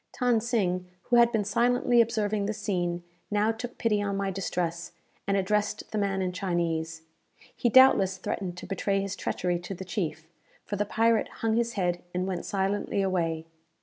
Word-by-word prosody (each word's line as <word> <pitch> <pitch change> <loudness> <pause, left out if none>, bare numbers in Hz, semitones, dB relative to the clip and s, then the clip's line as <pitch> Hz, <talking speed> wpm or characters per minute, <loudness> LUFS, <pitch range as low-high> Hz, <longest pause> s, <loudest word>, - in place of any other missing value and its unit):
Than 245 -3 +3
Sing, 185 -6 0 0.2
who 240 - +2
had 235 0 +6
been 220 -3 +1
silently 240 +3 +3
observing 215 -3 0
this 215 0 -3
scene, 175 -4 -2 0.3
now 210 +1 +2
took 235 +2 -7
pity 210 -3 +1
on 200 -1 -1
my 195 -1 -1
distress, 175 -3 -3 0.3
and 200 0 +2
addressed 210 +2 -1
the 215 - -1
man 195 -1 0
in 180 - -1
Chinese. 165 -3 -2 0.5
He 240 - +1
doubtless 205 -7 +6
threatened 180 -1 -4
to - - -7
betray 195 0 0
his 195 0 -3
treachery 175 -3 -1
to 180 +2 -6
the 190 - -7
chief; 160 -4 -3 0.4
for 205 - -3
the 205 +1 0
pirate 225 +1 +2 0.2
hung 220 -1 +2
his 235 0 0
head, 180 -3 -1
and 180 +1 0
went 185 -2 -3
silently 200 0 0
away. 165 -4 -1
195 Hz, 180 wpm, -28 LUFS, 180-220 Hz, 0.5 s, had